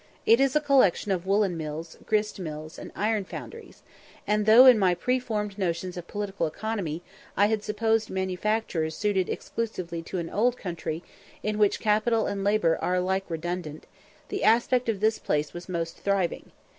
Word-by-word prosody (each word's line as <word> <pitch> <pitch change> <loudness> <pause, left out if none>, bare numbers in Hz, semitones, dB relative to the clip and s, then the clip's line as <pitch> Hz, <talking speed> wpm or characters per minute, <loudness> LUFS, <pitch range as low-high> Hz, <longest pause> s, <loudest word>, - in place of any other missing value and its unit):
It 230 +2 +6
is 275 0 +2
a - - +6
collection 260 - +3
of 185 -1 -1
woollen 200 -2 +2
mills, 155 +1 -6
grist 210 -1 0
mills, 155 -2 -7
and - - -9
iron 215 0 0
foundries; 460 - -10 0.4
and 210 0 +1
though, 230 +4 +9
in 250 -4 +8
my 185 -3 +3
preformed 215 -2 -2
notions 180 0 -2
of 175 -1 -7
political 200 -5 -2
economy, 175 -3 -4 0.3
I 205 - +5
had 215 0 0
supposed 220 +1 0
manufactures 190 -3 -1
suited 200 -3 0
exclusively 180 -7 -4
to 165 - -6
an 170 -2 -4
old 240 +4 +2
country, 170 -2 -5 0.4
in 215 0 -1
which 205 -1 +3
capital 220 +1 +2
and 200 -1 -2
labour 200 -5 +2
are 180 - 0
alike 190 +1 0
redundant, 165 -1 -4 0.4
the 400 - -3
aspect 240 +2 +3
of 205 -3 -1
this 220 +1 +2
place 150 0 -1
was 175 +2 -9
most 165 -2 -3
thriving. 195 -3 -1
200 Hz, 170 wpm, -27 LUFS, 175-220 Hz, 0.4 s, though